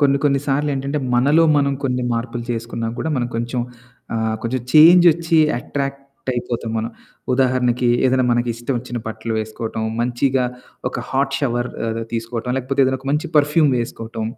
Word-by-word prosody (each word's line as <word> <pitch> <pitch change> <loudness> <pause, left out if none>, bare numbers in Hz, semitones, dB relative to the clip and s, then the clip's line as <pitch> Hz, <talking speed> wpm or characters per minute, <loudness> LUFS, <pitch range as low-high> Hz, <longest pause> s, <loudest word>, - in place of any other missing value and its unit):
కొన్ని 140 -1 +4
కొన్ని 140 -1 +3
సార్లేంటంటే, 140 0 0 0.2
మనలో 145 +7 +4
మనం 140 -1 +2
కొన్ని 125 -1 0
మార్పులు 115 0 -3
చేసుకున్నా 115 -1 -3
కూడా, 160 - -2
మనం 120 -1 -1
కొంచెం 120 +1 -2 0.5
ఆహ్, 110 -1 0
కొంచెం 120 +2 -1
చేంజొచ్చీ 165 0 +6 0.2
ఎట్రాక్టయిపోతాం 135 -4 -4
మనం. 115 +1 -3 0.4
ఉదాహరణకీ 125 -2 +2 0.2
ఏదన్నా 130 0 +2
మనకిష్టవొచ్చిన 120 +1 -2
బట్టలు 110 +1 -5
వేసుకోటం, 110 +1 -4 0.2
మంచిగా 125 +2 +1 0.5
ఒక - - -5
హాట్ 135 0 0
షవర్ 120 -3 -1 0.2
ఏదో 115 0 -3
తీసుకోటం, 115 +1 -3
లేకపోతే 135 +2 +1
ఏదన్నొక 130 +1 -2
మంచి 150 +3 -1
పర్ఫ్యూమ్ 150 0 +3
వేసుకోటం. 115 -1 -4
125 Hz, 135 wpm, -20 LUFS, 120-140 Hz, 0.5 s, చేంజొచ్చీ